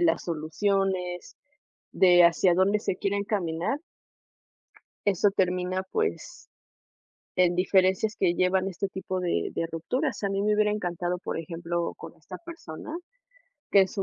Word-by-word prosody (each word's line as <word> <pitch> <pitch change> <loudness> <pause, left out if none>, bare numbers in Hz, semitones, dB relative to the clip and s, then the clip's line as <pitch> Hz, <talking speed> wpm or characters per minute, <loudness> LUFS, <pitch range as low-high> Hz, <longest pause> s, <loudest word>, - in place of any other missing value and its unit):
las 170 -1 +2
soluciones, 180 +2 -1 0.6
de 175 -2 +6
hacia 175 +1 +4
dónde 200 +3 +3
se 195 - -2
quiere 200 +1 -1
encaminar. 200 - -1 1.3
Eso 200 0 +3
termina, 185 0 0
pues, 440 -1 -3 0.9
en 180 -1 +4
diferencias 190 +4 +2
que 175 -2 +2
llevan 185 +1 +2
a - - -1
este 195 +2 -3
tipo 190 -1 -4
de 180 -1 -1
de 165 - -1
rupturas. 255 - -2
A 200 - +1
mí 195 0 -1
me 210 +1 +2
hubiera 210 0 +3
encantado, 180 -3 -2
por - - -4
ejemplo, 170 +1 -3
con - - -10
esta - - -10
persona, 325 - -9 0.8
que 200 - +7
en 190 - 0
su 195 +1 -3
185 Hz, 145 wpm, -27 LUFS, 175-200 Hz, 1.3 s, que